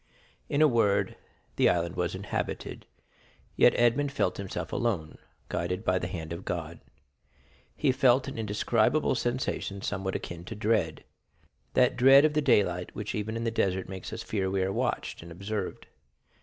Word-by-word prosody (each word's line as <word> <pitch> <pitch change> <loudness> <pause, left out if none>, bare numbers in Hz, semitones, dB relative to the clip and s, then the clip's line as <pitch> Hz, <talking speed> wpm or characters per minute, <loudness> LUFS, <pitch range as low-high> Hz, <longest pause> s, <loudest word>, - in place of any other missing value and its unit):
In 145 +2 +3
a - - +7
word, 100 -6 +2 0.4
the - - +5
island 85 0 0
was 90 0 -1
inhabited, 100 +2 -4 0.7
yet - - +6
Edmond 130 +4 +2
felt 95 - 0
himself 100 -1 -5
alone, 100 -10 -1 0.3
guided 90 +5 -3
by 95 0 +2
the 90 - -3
hand 85 -2 -5
of 85 +3 -7
God. 85 -1 -4 1.0
He - - +2
felt 130 0 +3
an - - -5
indescribable 110 +6 +1
sensation 120 -5 -2
somewhat 95 -1 -2
akin 85 0 -5
to 110 - -6
dread—that 105 -7 -2
dread 135 +3 +8
of 155 - +2
the 150 - +2
daylight 100 -9 +2
which 105 0 -4
even 110 +2 -3
in 115 - -3
the 115 - 0
desert 95 -4 0
makes 95 -1 -7
us - - -5
fear 95 -3 -1
we 95 0 0
are 95 +1 -1
watched - - -2
and 85 +1 -11
observed. 100 +3 -4
100 Hz, 160 wpm, -28 LUFS, 90-120 Hz, 1.0 s, dread